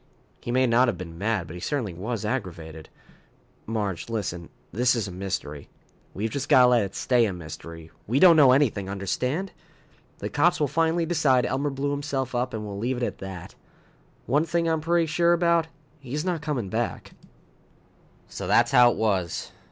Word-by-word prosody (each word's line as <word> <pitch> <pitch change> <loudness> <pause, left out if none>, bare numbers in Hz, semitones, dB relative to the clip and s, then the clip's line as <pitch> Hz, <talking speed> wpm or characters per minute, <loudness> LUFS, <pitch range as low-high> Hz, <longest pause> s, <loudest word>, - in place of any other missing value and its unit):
"He - - -9
may 130 +1 +3
not 125 +1 +4
have 115 -6 -1
been 85 -2 -9
mad, 105 -3 -1
but 80 - -10
he 90 - -7
certainly 115 - -2
was 105 +5 -4
aggravated. 85 -9 -5 0.8
Marge, 105 -4 -3
listen! 90 -7 -4 0.2
This 125 +3 +2
is 115 -3 -2
a - - -7
mystery. 90 -6 -5 0.5
We've 110 +3 -2
just 140 0 -4
got 130 - +7
to - - +6
let 120 -2 +4
it 100 0 -6
stay 120 -2 +2
a 100 - -2
mystery. 80 -1 -9 0.2
We 120 +6 0
don't 175 -1 +8
know 140 -5 +7
anything, 120 -8 +2
understand? 125 - -2 0.7
The - - -5
cops 175 +4 +2
will 150 - +2
finally 165 +3 +1
decide 150 -7 +2
Elmer 140 +2 -1
blew 140 +1 -2
himself 140 -3 -3
up, 125 +1 -1
and 110 -1 -5
we'll 100 -1 -6
leave 125 +4 -1
it 125 - -3
at - - -3
that. 95 -3 -8 0.7
One 145 +5 +2
thing 165 +1 0
I'm 160 -1 0
pretty 170 +1 +2
sure 170 +2 +2
about 170 -1 +2 0.3
he's 145 +4 -4
not 175 -4 -1
coming 140 -10 -3
back." - - -3 1.2
So - - -6
that's - - +3
how 125 0 +7
it - - -2
was. 95 -6 -1
125 Hz, 185 wpm, -25 LUFS, 100-145 Hz, 1.2 s, don't